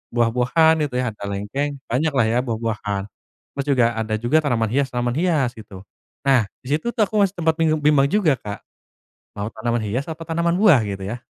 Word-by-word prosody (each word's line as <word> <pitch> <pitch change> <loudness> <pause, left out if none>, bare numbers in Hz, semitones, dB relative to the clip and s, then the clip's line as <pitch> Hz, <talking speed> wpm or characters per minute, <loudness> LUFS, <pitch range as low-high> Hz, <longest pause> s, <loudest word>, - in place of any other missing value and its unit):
buah-buahan, 125 +8 +3
gitu 125 - -9
ya, 125 -3 -1
ada 105 - -13
lengkeng, 105 +9 -3 0.2
banyaklah 135 0 +2
ya 120 +2 +2
buah-buahan. 110 -4 -2 0.5
Terus 140 - -2
juga 130 -4 +3
ada 110 -1 -2
juga 120 +8 +1
tanaman 115 -5 +1
hias-tanaman 125 -3 0
hias 160 -8 +1
gitu. 95 -3 -11 0.4
Nah, 130 -6 +3 0.2
di 125 - -12
situ 160 - -8
tuh 220 - +3
aku 210 +1 0
masih 200 -1 +2
sempat 160 -2 +1
bingung 155 -2 +2
bimbang 145 -2 +4
juga, 170 -11 +2
Kak. 100 -1 -7 0.7
Mau 100 - -3
tanaman 120 +1 -1
hias 120 +7 -2
atau 160 +1 -7
tanaman 170 +2 0
buah 185 - +6
gitu 100 -2 -5
ya? 115 +5 -4
125 Hz, 185 wpm, -21 LUFS, 115-160 Hz, 0.7 s, buah